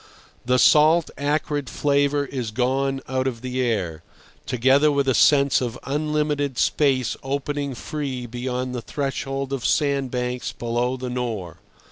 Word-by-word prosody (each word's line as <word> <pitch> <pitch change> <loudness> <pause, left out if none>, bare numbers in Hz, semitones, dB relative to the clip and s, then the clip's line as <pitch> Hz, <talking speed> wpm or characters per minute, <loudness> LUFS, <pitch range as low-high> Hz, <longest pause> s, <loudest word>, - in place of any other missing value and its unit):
The 125 0 +4
salt, 155 +5 +5
acrid 145 -1 -1
flavour 145 0 +1
is 130 -5 -4
gone 135 +3 0
out 130 0 -1
of 120 -3 -4
the 130 0 -2
air, 95 -10 -1 0.5
together 135 +4 +4
with 140 -1 +1
a 130 - +4
sense 140 +1 +4
of 120 -1 -3
unlimited 150 -2 -1
space 130 -7 +2
opening 140 0 -3
free 135 -2 -4
beyond 125 +1 -3
the 120 - -3
threshold 135 0 -3
of 135 -3 -3
sandbanks 125 -4 0
below 120 +2 -1
the 125 -1 -5
Nore. 110 -9 -4
135 Hz, 135 wpm, -23 LUFS, 125-140 Hz, 0.5 s, salt